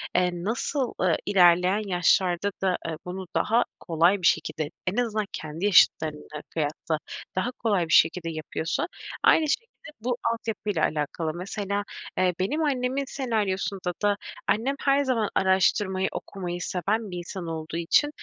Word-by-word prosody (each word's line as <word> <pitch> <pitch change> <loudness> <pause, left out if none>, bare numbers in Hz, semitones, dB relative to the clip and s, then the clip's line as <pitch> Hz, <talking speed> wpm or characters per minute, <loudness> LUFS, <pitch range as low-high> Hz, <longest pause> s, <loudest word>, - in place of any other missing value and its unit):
eee, 180 0 +3
nasıl, 230 - -2
ııı, 180 -3 +3
ilerleyen 180 +1 +4
yaşlarda 180 +1 +2
da, 185 -2 +2
eee, 165 -1 -3
bunu 185 +1 -6
daha 230 +3 +3 0.2
kolay 170 +4 +2
bir 175 - +4
şekilde, 155 -2 0 0.2
en 180 - 0
azından 220 -4 0
kendi 160 +4 -5
yaşıtlarına 155 -6 +3
kıyasla, 155 0 -2 0.4
daha 210 +7 0
kolay 205 -8 0
bir 160 - -1
şekilde 165 +1 +4
yapıyorsa 160 0 -3 0.4
aynı 315 - +5
şekilde 465 +10 0 0.3
bu 245 +1 -1 0.2
altyapıyla 210 -6 -2
alakalı. 155 +1 -2
Mesela, 200 +3 -3 0.3
eee, 185 -1 +3
benim 285 +13 0
annemin 265 -1 0
senaryosunda 200 -8 -1
da 205 -1 +3 0.3
annem 255 +6 +1
her 280 0 +3
zaman 235 -6 +1
araştırmayı, 190 0 +2
okumayı 175 -3 -5
seven 205 +4 -1
bir 180 - -5
insan 175 0 -6
olduğu 160 0 -4
için 170 - +3
190 Hz, 140 wpm, -26 LUFS, 170-220 Hz, 0.4 s, aynı